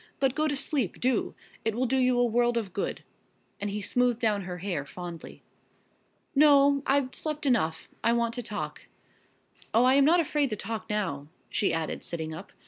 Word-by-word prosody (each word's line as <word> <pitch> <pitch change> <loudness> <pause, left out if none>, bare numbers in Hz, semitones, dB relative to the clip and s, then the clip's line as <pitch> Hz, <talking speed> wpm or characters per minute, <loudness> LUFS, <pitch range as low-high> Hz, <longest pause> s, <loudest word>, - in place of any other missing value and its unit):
But 270 -2 +2
go 310 +2 +1
to 290 - 0
sleep, 270 - -1
do! 255 -2 0 0.3
It 225 -1 0
will 255 +2 +1
do 265 +2 +1
you 255 -1 +3
a 245 - +4
world 240 +1 +2
of 205 -6 -3
good," 200 - -3 0.6
and 205 - -2
he 205 +1 -3
smoothed 245 0 +1
down 210 -5 +1
her 180 -1 -5
hair 180 -5 -3
fondly. 175 +2 -9 0.9
"No, 280 -1 +5
I've 270 -1 +2
slept 305 -1 -4
enough 215 - +1 0.2
I 230 - +4
want 235 0 +1
to 245 - -3
talk. 210 -3 -5 0.9
Oh, 230 - +6
I 255 +1 +5
am 280 0 +5
not 340 +4 +5
afraid 295 -3 +1
to 215 - -2
talk 220 +1 -5
now," 170 -10 -2 0.2
she 200 - +1
added, 165 -1 -2
sitting 160 -2 -4
up. 170 +5 -9
235 Hz, 190 wpm, -28 LUFS, 200-270 Hz, 0.9 s, Oh